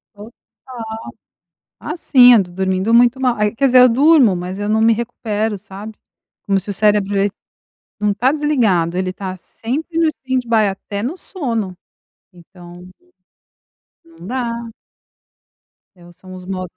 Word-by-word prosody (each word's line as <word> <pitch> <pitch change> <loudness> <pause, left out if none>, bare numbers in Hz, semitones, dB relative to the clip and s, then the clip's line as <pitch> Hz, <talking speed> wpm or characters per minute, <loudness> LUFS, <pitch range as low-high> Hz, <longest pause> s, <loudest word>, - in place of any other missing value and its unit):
Total. 210 +3 -12 1.5
Ah, - - -6
sim, 250 -5 +6
eu 220 -4 +5
tô 180 - -14
dormindo 190 +3 -1
muito 240 +2 +4
mal. 250 -2 +1
Ai 210 0 0
quer 275 +4 0
dizer, 255 -1 +5
eu 250 0 +7
durmo, 265 - +4
mas 180 +2 -5
eu 205 0 -3
não 220 +1 +2
me 225 +1 +5
recupero, 220 -2 -3 0.9
como 195 -1 +1
se 195 - -10
o 205 - -2
cérebro, 205 0 +1
ele 200 +1 +1 0.7
não 210 -1 +1
tá 245 +6 +1
desligado, 225 - +1
ele 185 0 -1
tá 185 -1 -6
sempre 295 - -5
no 330 - +3
standby 250 -7 0
até 200 +1 -7
no 290 +10 -4
sono, 230 - -4 0.6
então. 175 0 -14 1.2
Não 330 - -14
dá. 235 -1 -4 1.3
É 175 - -18
os 175 -1 -18
são 185 -1 -13
os 185 0 -10
modos 185 -1 -6
215 Hz, 150 wpm, -18 LUFS, 190-250 Hz, 1.5 s, eu